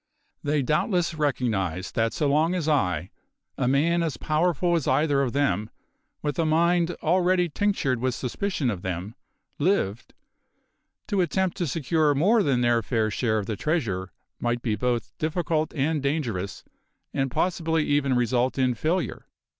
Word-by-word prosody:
They 145 Hz, -1 st, 0 dB
doubtless 170 Hz, -, +1 dB
recognised 105 Hz, -, -1 dB
that 115 Hz, 0 st, +1 dB
so 150 Hz, -, 0 dB
long 155 Hz, +5 st, +2 dB
as 170 Hz, -4 st, -2 dB
I 90 Hz, -, +1 dB, 0.4 s
a 125 Hz, -, 0 dB
man 160 Hz, +6 st, +2 dB
as 160 Hz, -7 st, -2 dB
powerful 170 Hz, +3 st, +1 dB
as 165 Hz, -, -1 dB
either 140 Hz, +1 st, +2 dB
of 130 Hz, -3 st, 0 dB
them, 110 Hz, -7 st, 0 dB, 0.5 s
with 145 Hz, -1 st, -2 dB
a -, -, +3 dB
mind 170 Hz, +2 st, +2 dB
already 180 Hz, +1 st, +2 dB
tinctured 150 Hz, -, 0 dB
with 130 Hz, 0 st, 0 dB
suspicion 135 Hz, +1 st, -2 dB
of 95 Hz, -5 st, -5 dB
them 95 Hz, +2 st, -4 dB, 0.5 s
lived, 145 Hz, -, 0 dB, 0.9 s
to 200 Hz, -2 st, +1 dB
attempt 185 Hz, +1 st, 0 dB
to 175 Hz, -, -1 dB
secure 155 Hz, +1 st, +1 dB
more 205 Hz, +11 st, +4 dB
than 135 Hz, -9 st, +1 dB
their 120 Hz, -1 st, +3 dB
fair 110 Hz, -1 st, 0 dB
share 110 Hz, 0 st, 0 dB
of 105 Hz, -, -2 dB
the 110 Hz, -, -3 dB
treasure 100 Hz, -, -1 dB, 0.3 s
might 120 Hz, 0 st, -1 dB
be 110 Hz, -3 st, 0 dB
both 120 Hz, -1 st, -2 dB
difficult 155 Hz, 0 st, 0 dB
and 150 Hz, +1 st, 0 dB
dangerous, 120 Hz, -, -2 dB, 0.5 s
and 135 Hz, 0 st, 0 dB
possibly 165 Hz, +1 st, 0 dB
even 140 Hz, -2 st, +2 dB
result 125 Hz, +2 st, +1 dB
in 130 Hz, -2 st, +2 dB
failure. 160 Hz, +9 st, -2 dB
145 Hz, 155 wpm, -25 LUFS, 120-165 Hz, 0.9 s, more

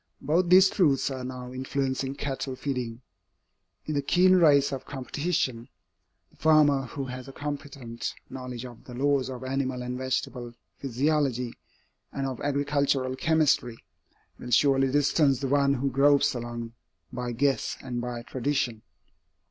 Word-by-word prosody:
Both 170 Hz, +5 st, +1 dB
these 185 Hz, +1 st, +8 dB
truths 145 Hz, -8 st, +2 dB
are 130 Hz, -1 st, -5 dB
now 125 Hz, 0 st, -7 dB
influencing 130 Hz, +1 st, -2 dB
cattle 135 Hz, -2 st, -4 dB
feeding. 125 Hz, -3 st, -4 dB, 0.8 s
In 155 Hz, -, -3 dB
the 145 Hz, -, +1 dB
keen 180 Hz, +6 st, +4 dB
race 145 Hz, -5 st, +5 dB
of 135 Hz, -1 st, -4 dB
competition, 135 Hz, -3 st, -2 dB, 0.6 s
the -, -, -26 dB
farmer 145 Hz, -4 st, +4 dB
who 135 Hz, +3 st, -5 dB
has 130 Hz, 0 st, -7 dB
a -, -, -8 dB
competent 140 Hz, -5 st, -6 dB
knowledge 125 Hz, -2 st, -7 dB
of 120 Hz, -2 st, -12 dB
the 125 Hz, -, -9 dB
laws 140 Hz, 0 st, +1 dB
of 130 Hz, -1 st, -7 dB
animal 130 Hz, -1 st, -2 dB
and 125 Hz, +1 st, -4 dB
vegetable 125 Hz, -2 st, -3 dB, 0.2 s
physiology 135 Hz, -2 st, 0 dB, 0.6 s
and 135 Hz, -, -3 dB
of 130 Hz, -2 st, -4 dB
agricultural 140 Hz, -2 st, 0 dB
chemistry, 145 Hz, -6 st, +2 dB, 0.6 s
will 125 Hz, -, -8 dB
surely 135 Hz, +1 st, +3 dB
distance 145 Hz, -1 st, +3 dB
the 135 Hz, -, -2 dB
one 140 Hz, 0 st, +3 dB
who 135 Hz, +1 st, -1 dB
gropes 145 Hz, +2 st, +4 dB
along 120 Hz, -1 st, -6 dB, 0.4 s
by 125 Hz, -1 st, -3 dB
guess 135 Hz, +3 st, 0 dB
and 120 Hz, -2 st, -4 dB
by 120 Hz, -1 st, -5 dB
tradition. 130 Hz, -3 st, -2 dB
135 Hz, 140 wpm, -27 LUFS, 125-145 Hz, 0.8 s, these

